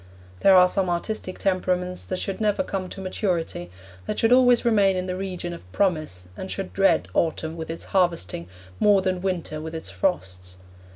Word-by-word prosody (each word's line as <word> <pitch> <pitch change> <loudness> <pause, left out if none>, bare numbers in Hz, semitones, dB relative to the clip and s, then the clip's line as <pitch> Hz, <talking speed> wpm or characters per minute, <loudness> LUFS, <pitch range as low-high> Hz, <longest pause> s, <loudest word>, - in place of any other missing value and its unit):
There 195 - +6
are 180 0 +8
some 185 0 0
artistic 185 +2 -3
temperaments 180 -1 0
that 185 - -3
should 195 +3 -3
never 215 +5 +2
come 190 -7 -4
to - - -8
maturity, 180 - -2 0.4
that - - -2
should 225 - +2
always 245 -2 +5
remain 200 -5 +4
in 180 - -2
the 180 0 -3
region 185 -2 -4
of 90 - -12
promise 155 - 0
and 190 - -7
should 195 -1 -4
dread 195 0 +3
autumn 160 0 0
with 160 -1 -6
its 165 - -5
harvesting 170 - +1 0.3
more 200 -2 +4
than 185 -1 -1
winter 175 -5 -2
with 160 +1 -6
its 160 - -7
frosts. 90 - -2
185 Hz, 180 wpm, -24 LUFS, 165-195 Hz, 0.4 s, are